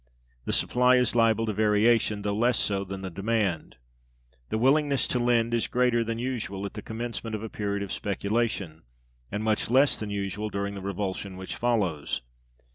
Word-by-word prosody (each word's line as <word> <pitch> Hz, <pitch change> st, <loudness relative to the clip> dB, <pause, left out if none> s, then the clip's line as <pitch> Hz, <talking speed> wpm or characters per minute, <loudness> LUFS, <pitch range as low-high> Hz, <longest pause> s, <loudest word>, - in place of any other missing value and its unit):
The -, -, -1 dB
supply 125 Hz, +1 st, +3 dB
is 125 Hz, -2 st, +2 dB
liable 115 Hz, -1 st, +3 dB
to 110 Hz, -, -1 dB
variation, 105 Hz, 0 st, +3 dB
though 100 Hz, 0 st, -1 dB
less 120 Hz, +2 st, +2 dB
so 100 Hz, -1 st, 0 dB
than 95 Hz, 0 st, -6 dB
the 95 Hz, -, -5 dB
demand. 100 Hz, -2 st, -1 dB, 0.7 s
The -, -, -1 dB
willingness 140 Hz, +3 st, +3 dB
to 125 Hz, -, +1 dB
lend 120 Hz, -1 st, +2 dB
is 115 Hz, -, +1 dB
greater 125 Hz, -1 st, +2 dB
than 115 Hz, 0 st, -3 dB
usual 115 Hz, -6 st, -3 dB
at 100 Hz, -, -6 dB
the 105 Hz, -, -6 dB
commencement 115 Hz, 0 st, -4 dB
of 105 Hz, -, -5 dB
a 110 Hz, -, -5 dB
period 100 Hz, -1 st, -2 dB
of 100 Hz, -, -6 dB
speculation, 100 Hz, -5 st, -2 dB, 0.5 s
and 105 Hz, +2 st, -2 dB
much 110 Hz, 0 st, +1 dB
less 135 Hz, +4 st, +5 dB
than 105 Hz, -, -4 dB
usual 100 Hz, +1 st, -3 dB
during 100 Hz, 0 st, -3 dB
the 100 Hz, -, -7 dB
revulsion 95 Hz, 0 st, -4 dB
which 95 Hz, 0 st, -6 dB
follows. 95 Hz, -, 0 dB
110 Hz, 180 wpm, -27 LUFS, 100-120 Hz, 0.7 s, less